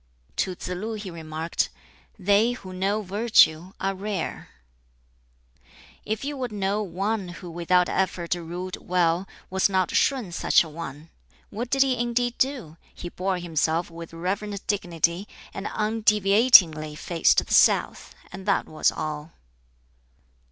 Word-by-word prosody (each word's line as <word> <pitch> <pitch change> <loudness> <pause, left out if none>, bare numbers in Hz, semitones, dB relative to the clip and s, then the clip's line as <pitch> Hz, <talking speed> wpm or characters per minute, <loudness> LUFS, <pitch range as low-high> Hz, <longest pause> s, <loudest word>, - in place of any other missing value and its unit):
To 185 -1 -1
Tsz 180 - -7
lu 200 +5 -4
he 205 -3 -6
remarked, 160 0 -3 0.5
"They 205 +5 +3
who 190 -6 -9
know 200 +3 -1
Virtue 190 -4 +3
are 195 0 -1
rare." 195 -2 -4 1.6
"If 220 +4 -3
you 290 0 -3
would 250 -3 -3
know 200 0 -1
one 200 +2 -2
who 175 0 -9
without 175 +1 +2
effort 180 -3 -1
ruled 175 +2 -5
well, 175 0 0 0.2
was 190 +1 +2
not 190 -2 +1
Shun 255 -10 +1
such 170 - +3
a 160 - -9
one? 155 -1 -8 0.4
What 235 +3 -4
did 270 +1 +4
he 260 -3 0
indeed 240 0 -1
do? 250 - -1 0.2
He 175 - -7
bore 185 +1 -2
himself 165 0 -1
with 165 0 -9
reverent 195 +4 -4
dignity 175 -1 0 0.3
and 195 - -5
undeviatingly 210 -7 +4
'faced 170 0 +2
the - - -3
south,' - - +3 0.2
and 190 - -9
that 200 - +2
was 155 - +1
all." 155 +1 -5
185 Hz, 135 wpm, -25 LUFS, 170-210 Hz, 1.6 s, did